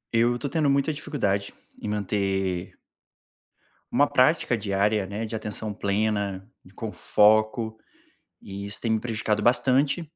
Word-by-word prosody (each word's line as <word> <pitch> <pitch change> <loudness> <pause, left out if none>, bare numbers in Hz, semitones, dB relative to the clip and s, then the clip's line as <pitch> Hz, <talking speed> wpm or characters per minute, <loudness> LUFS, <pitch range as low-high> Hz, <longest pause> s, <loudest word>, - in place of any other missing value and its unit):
Eu 120 +1 +3
tô 140 - -4
tendo 150 -1 +1
muita 140 +3 +2
dificuldade 100 -10 -2 0.3
em - - -5
manter 95 -3 -1 1.2
uma 145 +4 +4
prática 130 -2 +3
diária, 100 0 +1
né, 105 +4 -4
de 110 - -5
atenção 105 0 -4
plena 100 -1 -1 0.2
e - - -17
com - - -6
foco, 110 +1 +2 0.6
e 100 +1 -7
isso 100 0 -3
tem 115 - 0
me 110 - +2
prejudicado 110 -2 -1
bastante, 130 +6 +3
110 Hz, 135 wpm, -25 LUFS, 100-120 Hz, 1.2 s, uma